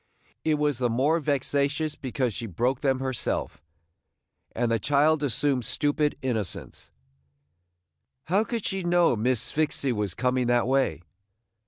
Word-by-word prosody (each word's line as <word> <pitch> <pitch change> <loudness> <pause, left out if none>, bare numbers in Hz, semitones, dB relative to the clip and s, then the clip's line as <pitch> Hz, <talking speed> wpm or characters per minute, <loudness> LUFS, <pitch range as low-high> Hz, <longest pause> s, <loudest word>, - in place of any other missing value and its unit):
It 155 -1 +2
was 150 -3 0
the 125 -2 +1
more 140 +8 +2
vexatious 145 +1 0
because 130 -3 -2
she 115 +2 -5
broke 120 +7 -1
them 135 -2 +1
herself. 130 - -3 0.9
And 120 0 0
the 115 - +2
child 145 +5 +3
assumed 135 -1 0
stupid 145 +5 0
innocence: 110 -8 -4 1.3
"How 195 +8 +2
could 230 -2 -4
she 190 0 -1
know 175 -5 +3
Miss 120 +2 +1
Sphyxy 145 -3 0
was 105 -5 -2
coming 125 +1 0
that 120 0 +3
way?" 130 -8 +1
135 Hz, 135 wpm, -26 LUFS, 120-150 Hz, 1.3 s, child